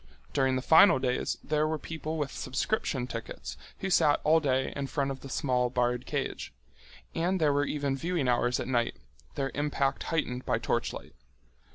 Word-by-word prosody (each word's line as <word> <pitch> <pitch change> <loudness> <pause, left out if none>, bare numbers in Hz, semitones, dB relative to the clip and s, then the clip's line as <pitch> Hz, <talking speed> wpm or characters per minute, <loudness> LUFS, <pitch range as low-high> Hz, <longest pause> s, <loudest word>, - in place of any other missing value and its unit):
During 130 -1 +2
the 130 - -2
final 165 +4 +7
days 130 -1 -1
there 150 0 +1
were 160 0 -1
people 160 +1 -5
with 145 -3 -2
subscription 130 - -1
tickets 115 -2 -6 0.3
who 195 - -2
sat 145 -4 +4
all 160 +2 +5
day 130 -3 0
in 140 -1 -3
front 140 -1 -1
of 135 - -6
the 135 - -10
small 125 -2 +1
barred 125 0 0
cage. - - -3 0.6
And 180 +3 0
there 150 -3 +3
were 145 0 +2
even 140 -2 -1
viewing 165 -1 -1
hours 120 0 +2
at - - -3
night, 120 -2 0 0.4
their 135 -1 -1
impact 145 -2 0
heightened 130 -6 -1
by - - +1
torchlight. - - -2
140 Hz, 175 wpm, -29 LUFS, 130-155 Hz, 0.6 s, final